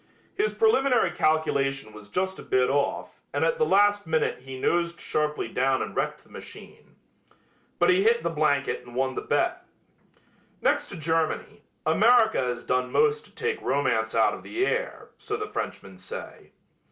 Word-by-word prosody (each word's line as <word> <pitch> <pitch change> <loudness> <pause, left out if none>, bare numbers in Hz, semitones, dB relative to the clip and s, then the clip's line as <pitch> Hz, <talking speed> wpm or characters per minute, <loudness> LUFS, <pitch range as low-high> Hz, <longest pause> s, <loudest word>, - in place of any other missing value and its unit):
His 420 +3 -1
preliminary 275 - +3
calculation 140 -8 0
was 105 -1 -13
just 190 - -2
a - - -7
bit 130 0 +1
off 140 0 -2
and - - 0
at 485 0 0
the 465 - +4
last 205 -2 +3
minute 160 -1 0
he 130 0 -9
nosed 170 +3 0
sharply 150 -4 -1
down 130 +3 +1
and - - -7
wrecked - - -2
the - - -25
machine. - - -12 0.8
But 175 - +4
he 185 +1 +3
hit 230 +3 +3
the 170 - -1
blanket 145 -5 0
and 120 -1 -13
won 130 0 0
the - - -4
bet. 355 +1 0 1.0
Next - - +1
to 195 - -7
Germany, 160 0 -1 0.2
America 225 +8 +4
has 125 -1 -3
done 125 0 0
most 445 0 +2
to - - -20
take 455 -2 -2
romance 110 -6 0
out 115 - +4
of - - -7
the 365 +3 -1
air, - - -3
so 425 - -4
the 425 - -3
Frenchmen - - -6
say. 485 - -9
165 Hz, 170 wpm, -26 LUFS, -, 1.0 s, the